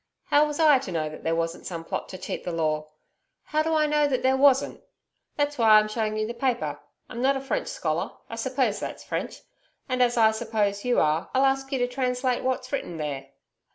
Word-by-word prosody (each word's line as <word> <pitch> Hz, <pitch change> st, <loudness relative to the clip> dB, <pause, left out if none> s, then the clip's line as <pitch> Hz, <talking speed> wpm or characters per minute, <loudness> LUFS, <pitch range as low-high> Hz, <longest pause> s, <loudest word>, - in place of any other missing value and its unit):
How 295 Hz, +1 st, +5 dB
was 295 Hz, +1 st, -5 dB
I 300 Hz, -4 st, +6 dB
to 230 Hz, -8 st, -7 dB
know 155 Hz, -2 st, -1 dB
that 155 Hz, -, -11 dB
there 165 Hz, 0 st, 0 dB
wasn't 165 Hz, 0 st, -3 dB
some 170 Hz, -2 st, -5 dB
plot -, -, -4 dB
to 185 Hz, -, -7 dB
cheat 185 Hz, -, -5 dB
the 175 Hz, -, -3 dB
law? 155 Hz, -2 st, -1 dB, 0.5 s
How 305 Hz, 0 st, 0 dB
do 320 Hz, +1 st, 0 dB
I 305 Hz, -1 st, +3 dB
know 300 Hz, 0 st, +2 dB
that 260 Hz, -3 st, -1 dB
there 260 Hz, 0 st, +4 dB
wasn't? 270 Hz, 0 st, +3 dB, 0.5 s
That's 290 Hz, -1 st, -1 dB
why 220 Hz, -2 st, +7 dB
I'm 215 Hz, 0 st, +3 dB
showing 215 Hz, 0 st, -2 dB
you 215 Hz, -, 0 dB
the 235 Hz, -, -4 dB
paper. 245 Hz, 0 st, -1 dB, 0.3 s
I'm 240 Hz, 0 st, -6 dB
not 270 Hz, +1 st, +3 dB
a -, -, -3 dB
French 275 Hz, -, -2 dB
scholar -, -, -2 dB
I -, -, -7 dB
suppose -, -, 0 dB
that's -, -, -6 dB
French -, -, -4 dB, 0.5 s
and 255 Hz, 0 st, 0 dB
as 240 Hz, -1 st, +3 dB
I 220 Hz, -1 st, +6 dB
suppose 215 Hz, -3 st, -1 dB
you 245 Hz, -1 st, +2 dB
are, 155 Hz, +4 st, +1 dB
I'll 265 Hz, +1 st, +4 dB
ask 270 Hz, 0 st, 0 dB
you 270 Hz, -, 0 dB
to 245 Hz, -1 st, +1 dB
translate 250 Hz, 0 st, -1 dB
what's 255 Hz, 0 st, -2 dB
written 180 Hz, -, -3 dB
there.' 145 Hz, -3 st, -4 dB
245 Hz, 225 wpm, -26 LUFS, 200-270 Hz, 0.5 s, why